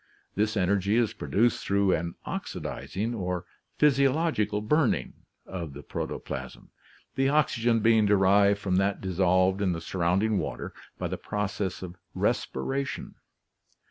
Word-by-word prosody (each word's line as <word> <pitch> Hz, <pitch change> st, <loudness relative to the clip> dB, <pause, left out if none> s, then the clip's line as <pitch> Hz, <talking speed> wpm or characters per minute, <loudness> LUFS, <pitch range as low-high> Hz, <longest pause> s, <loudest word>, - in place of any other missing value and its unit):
This 105 Hz, +1 st, 0 dB
energy 100 Hz, +2 st, +2 dB
is 120 Hz, -2 st, +2 dB
produced 115 Hz, +3 st, +1 dB
through 100 Hz, -1 st, +2 dB
an 85 Hz, +1 st, -2 dB
oxidizing, 110 Hz, +6 st, -4 dB
or 90 Hz, -5 st, -3 dB, 0.3 s
physiological 140 Hz, -6 st, +2 dB
burning, 130 Hz, +5 st, +1 dB, 0.3 s
of 85 Hz, -6 st, -6 dB
the 70 Hz, +1 st, -9 dB
protoplasm, -, -, -6 dB, 0.4 s
the 135 Hz, +1 st, +2 dB
oxygen 120 Hz, -6 st, +2 dB
being 110 Hz, -1 st, +4 dB
derived 100 Hz, 0 st, +4 dB
from 95 Hz, -3 st, 0 dB
that 100 Hz, +1 st, +1 dB
dissolved 95 Hz, +1 st, +2 dB
in 95 Hz, -3 st, +2 dB
the 80 Hz, -, -3 dB
surrounding 95 Hz, +5 st, +1 dB
water -, -, -5 dB, 0.2 s
by -, -, -2 dB
the -, -, -4 dB
process 105 Hz, -2 st, -3 dB
of 90 Hz, 0 st, -8 dB, 0.2 s
respiration. 135 Hz, -, -2 dB
100 Hz, 125 wpm, -27 LUFS, 95-115 Hz, 0.4 s, being